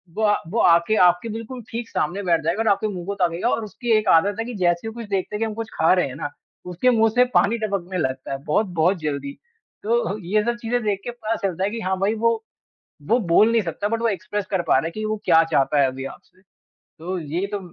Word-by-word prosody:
वो 220 - -1
अ, 210 -1 +3
वो 215 +8 -2
आके 170 +5 +4
आपके 175 +6 0
बिल्कुल 230 +3 -6
ठीक 230 0 -5
सामने 180 +6 -2
बैठ 170 -3 +2
जाएगा 170 +7 0
और - - -2
आपके 200 +2 +2
मुँह 175 -2 -6
को 200 - -2
ताकेगा 180 +2 0
और 230 - 0
उसकी 235 +3 -4
एक 215 -1 -1
आदत 200 +4 -2
है 225 - -1
कि 245 - -6
जैसे 175 +1 +1
ही - - -2
वो - - -10
कुछ 230 -2 -7
देखता 195 +1 -2
है - - -3
कि 225 - +1
हम 220 - -4
कुछ 225 0 -5
खा 160 +3 +3
रहे 180 -4 +2
हैं 130 - -8
ना, 145 0 -4 0.4
उसके 180 +8 +1
मुँह 225 -1 +4
से 250 0 +6
पानी 220 +4 +4
टपकने 195 -4 -3
लगता 130 -5 -3
है 135 - -2
बहुत-बहुत 175 +2 +1
जल्दी। 140 -2 -3 0.5
तो 215 -3 0
ये 210 +5 +1
सब 235 +1 -1
चीज़ें 240 +1 -1
देख 205 -2 0
के 240 - -4
पता 230 -2 -3
चलता 185 -2 -1
है 195 - +1
कि 230 0 -5
हाँ 190 -2 -1
भाई 200 +3 +1
वो 230 0 +1 0.7
वो 235 - +4
बोल 205 +3 +4
नहीं 230 -1 +3
सकता 185 +3 -3
बट 230 +1 -1
वो 230 - +2
एक्सप्रेस 205 0 -3
कर 190 -3 0
पा - - +4
रहा 135 - -1
है - - -2
कि 215 +3 -5
वो 215 0 -1
क्या 165 - +6
चाहता 145 0 +3
है 140 - +5
अभी 130 +1 -6
आपसे। 185 +6 -11 0.4
तो 180 +3 -7
ये 165 +4 -3
तो 205 - -2
200 Hz, 260 wpm, -22 LUFS, 170-225 Hz, 0.7 s, से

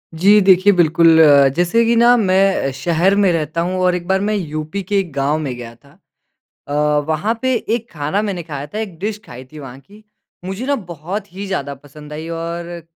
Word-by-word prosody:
जी 200 +6 +5
देखिए 190 +1 +5
बिल्कुल, 165 -1 +4 0.4
जैसे 180 +7 +2
कि 235 +1 +2
ना 240 +1 +5
मैं 190 -7 +1
शहर 170 +8 +1
में 200 -2 +3
रहता 160 0 -2
हूँ 185 +2 -2
और 180 -1 +2
एक 175 -1 -6
बार 190 +1 +1
मैं 210 +1 -1
यूपी 155 +1 -4
के 200 +2 0
एक 185 -4 -4
गाँव 140 +2 0
में 140 -5 -4
गया 120 -1 -9
था। 140 +4 -24 0.8
अ, 145 - -5 0.3
वहाँ 160 +8 0
पे 260 0 +1
एक 230 0 -3
खाना 155 +6 -2
मैंने 195 -5 -4
खाया 145 -3 -6
था। 180 - -8
एक 200 -7 -6
डिश 210 +2 -4
खाई 125 -4 -11
थी 155 - -11
वहाँ 135 -2 -10
की। 205 +10 -19 0.4
मुझे 195 +6 -5
ना 285 +1 +1
बहुत 180 - -7
ही 195 +2 -6
ज़्यादा 140 -7 -4
पसंद 150 +2 -13
आई 155 +2 -7
और 170 +1 -5
175 Hz, 205 wpm, -18 LUFS, 155-200 Hz, 0.8 s, जी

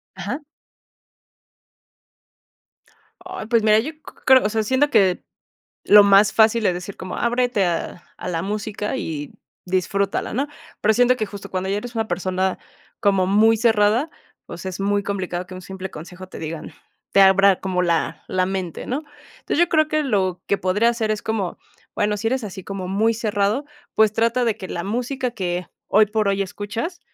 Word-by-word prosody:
Ajá. 200 - -4 2.8
Ay, 370 -5 -6
pues, 230 -2 +2
mira, 215 0 +5
yo 280 +8 -3
c 310 - -26 0.3
creo 265 -3 +7
o - - +2
sea, 220 0 0
siento 260 +6 +2
que 190 -9 +3 0.6
lo 210 0 +8
más 200 +1 +5
fácil, 220 0 +4
es 180 - +2
decir 180 +3 -7
como: 185 - -6
"Ábrete 240 -3 +1
a 175 0 -2
a - - -6
la 165 -2 -2
música 210 +3 -3
y 150 - -5 0.3
disfrútala", 190 +2 -1
¿no?, 280 +4 -1 0.3
pero 220 +1 +3
siento 245 +2 +4
que, 215 - -2
justo, 200 -1 -9
cuando 185 0 -2
ya 200 - 0
eres 240 +3 -6
una 225 -1 -1
persona 185 +1 -1 0.4
como 195 -2 +3
muy 220 +4 +4
cerrada, 225 +5 +2 0.4
pues, 170 - -9
es 190 +1 -5
muy 205 +1 +1
complicado 185 -3 -3
que 185 - -10
un 185 - -9
simple 190 0 -7
consejo 180 +4 -10
te - - -9
digan 160 0 -6 0.4
te 195 - +6
abra 195 0 +5
como 185 -1 -1
la 170 -2 0
la 185 0 +1
mente, 185 -3 -4
¿no? 270 +5 -2 0.4
Entonces, - - -2
yo 345 0 +4
creo 310 -2 +3
que 310 0 +1
lo 190 -9 0
que 200 - +1
podría 195 +5 +2
hacer 230 -2 0
es 215 - -1
como, 210 -5 -2 0.4
bueno, 210 0 0
si 215 +2 -4
eres 255 0 0
así 190 -2 -8
como 195 -2 -5
muy 220 +4 +2
cerrado, 215 +3 0 0.3
pues, 220 -1 +4
trata 230 +2 +1
de 220 -2 0
que 190 -3 -8
la 170 - -4
música 250 +4 -2
que 180 -5 -3 0.2
hoy 215 +1 +4
por 215 0 0
hoy 195 0 +1
escuchas, 210 - -5
205 Hz, 180 wpm, -22 LUFS, 185-230 Hz, 2.8 s, lo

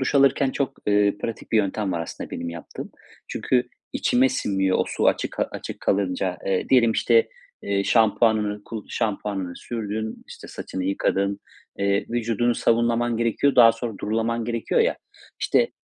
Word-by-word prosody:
Duş 130 - -1
alırken 140 -1 +4
çok, 135 0 -2
ııı, 100 0 +3
pratik 115 0 -6
bir - - +4
yöntem 100 -1 0
var 85 - -2
aslında - - -7
benim 85 - -4
yaptığım. 85 0 -8 0.4
Çünkü 125 -1 0 0.2
içime 130 +2 +3
sinmiyor, 95 -4 0
o - - +2
su - - 0
açık - - -1 0.2
açık - - -7
kalınca. 95 -2 0
Eee, 95 -1 0
diyelim 120 -3 +5
işte, 460 - +3 0.3
eee, 100 -1 0
şampuanını, 105 -2 +2
ku 110 -2 -7
şampuanını 100 -5 -2
sürdün, 110 -1 -5
işte, - - -11
saçını 95 -1 -5
yıkadın, 100 +1 0 0.4
eee, 100 0 +1
vücudunu 120 0 +1
sabunlaman 120 0 +1
gerekiyor, 115 +4 +1
daha 115 -2 +8
sonra 115 -3 -5
durulaman 115 +2 -1
gerekiyor 115 -1 0
ya, - - +2 0.4
işte, - - +2
110 Hz, 150 wpm, -24 LUFS, 100-120 Hz, 0.4 s, daha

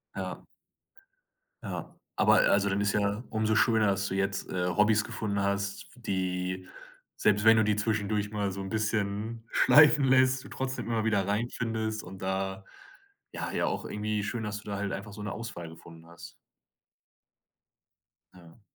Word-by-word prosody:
Ja. - - -5 1.2
Ja, - - -6 0.2
aber - - +4
also, 100 0 +3
dann 100 +1 0
ist 100 0 +1
ja 105 +2 0
umso 110 0 0
schöner, 110 -1 +4
dass 95 0 0
du 95 - -3
jetzt, 95 0 -1
äh, 90 -1 -1
Hobbys 105 +4 +3
gefunden 100 -2 -3
hast, 100 0 -2
die 95 -4 -3 0.5
selbst 105 +1 +2
wenn 110 0 +8
du 110 - +5
die 105 0 +2
zwischendurch 105 -1 -1
mal 100 -2 -1
so 95 +1 -5
'n 95 - -5
bisschen 110 +1 -2
schleifen 150 -1 +6
lässt, 130 0 +4
du - - -12
trotzdem 130 0 -4
immer 115 -2 0
wieder 100 -4 +1
reinfindest 110 0 -2
und 95 +1 -10
da, 95 0 -2 0.7
ja - - -4
ja - - 0
auch - - -3
irgendwie 105 0 -2
schön, 110 +2 -3
dass 105 -1 -3
du 105 - -10
da 100 - -3
halt 100 -1 -2
einfach 100 +1 -6
so 105 - -9
'ne 105 - -4
Auswahl 100 -8 -6
gefunden 80 0 -14
hast. 85 0 -12 2.0
Ja. 90 +4 -17
105 Hz, 165 wpm, -29 LUFS, 95-110 Hz, 2.0 s, wenn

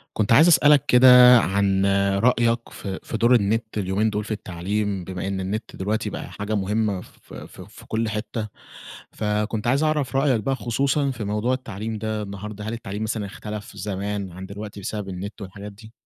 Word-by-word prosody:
كنت 105 0 0
عايز 155 +8 +7
أسألك 150 -4 +5
كده 125 0 +8
عن 95 -1 +1 0.4
رأيك 115 -1 +2
في 95 -2 -6
في 115 - -4
دور 120 +2 +4
النت 110 0 0
اليومين 100 +2 0
دول 105 0 -2
في 110 - -8
التعليم، 100 0 -3
بما 90 +1 -5
إن 100 -1 -2
النت 100 +4 -4
دلوقتي 105 +3 -2
بقى - - -7
حاجة 105 +1 -3
مهمّة 100 -1 0
ف - - -17
ف - - -10
في - - -14
كل 110 0 -1
حتّة، 110 0 -4 0.7
فكنت 105 +1 -2
عايز 135 +5 +2
أعرف 150 -4 0
رأيك 135 -4 +2
بقى، 135 - 0
خصوصًا 135 +4 0
في 115 -4 -6
موضوع 105 +5 0
التعليم 110 -3 -5
ده 110 0 -3
النهارده، 105 +1 -7
هل 110 - -3
التعليم 105 -2 -5
مثلًا 110 -1 -2
إختلف 105 +1 -8
زمان 100 0 -4
عن 95 +2 -8
دلوقتي 100 +1 -8
بسبب 100 0 -4
النت 100 +4 -7
والحاجات 100 +2 -8
دي؟ 110 +2 -15
105 Hz, 180 wpm, -23 LUFS, 100-115 Hz, 0.7 s, كده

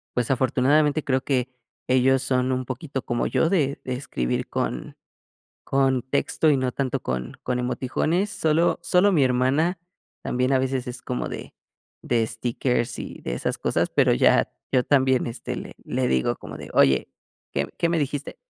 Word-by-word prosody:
pues, 125 +1 0
afortunadamente 140 +4 +2
creo 130 -1 +1
que 130 -2 0 0.4
ellos 130 +1 +4
son 130 -1 +1
un 130 - -1
poquito 135 +2 -5
como 120 0 -1
yo 165 - +2
de 145 -7 +1
de 130 -1 -3
escribir 65 - -2
con - - -3 0.7
con 135 -2 +2
texto 145 +3 +1
y 140 - +4
no 130 -1 -1
tanto 135 -1 -1
con 65 - -4
con 125 0 -1
emoticones, 155 +10 0
Sólo 160 +2 +2
sólo 180 +4 +4
mi 150 -6 +4
hermana 135 +8 +2 0.4
también, 125 +1 0
a 130 - +4
veces 130 0 -1
es 125 +1 -7
como 125 - -3
de - - -7 0.5
de 115 -2 +1
stickers 120 +1 -1
y - - -7
de - - -3
esas - - -2
cosas, - - 0
pero - - +3
ya, - - +3 0.2
yo 125 -1 +4
también, 130 -3 +3
este, 120 +2 -5
le - - -8
le - - 0
digo 65 -1 +1
como - - -9
de: - - -9
"Oye, 65 -2 +4 0.5
¿qué - - -1
qué 170 - +2
me 170 0 +1
dijiste?" 145 -1 -3
130 Hz, 170 wpm, -24 LUFS, 125-145 Hz, 0.7 s, ellos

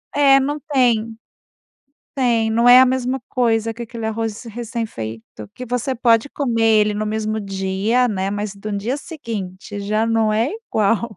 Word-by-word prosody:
É, 275 -1 +6
não 290 +3 -2
tem. 230 -4 +2 1.0
Tem, 235 -4 +2
não 230 +2 +2
é 245 +1 +9
a 260 - +7
mesma 260 0 -1
coisa 225 -3 0
que 235 +1 -7
aquele 230 -1 -7
arroz 220 0 -3
recém-feito 215 - -6
que 250 - -8
você 250 +2 -2
pode 230 +1 +2
comer 240 -6 -1
ele 215 -2 +4
no 210 +1 -2
mesmo 215 0 -2
dia, 195 +5 0
né, 195 -3 -2
mas 205 0 -4
no 210 +2 -6
dia 225 +7 -2
seguinte 210 - -7
já 215 +2 0
não 225 -1 +1
é 225 +5 +1 0.2
igual. 215 +1 0
225 Hz, 160 wpm, -20 LUFS, 210-245 Hz, 1.0 s, é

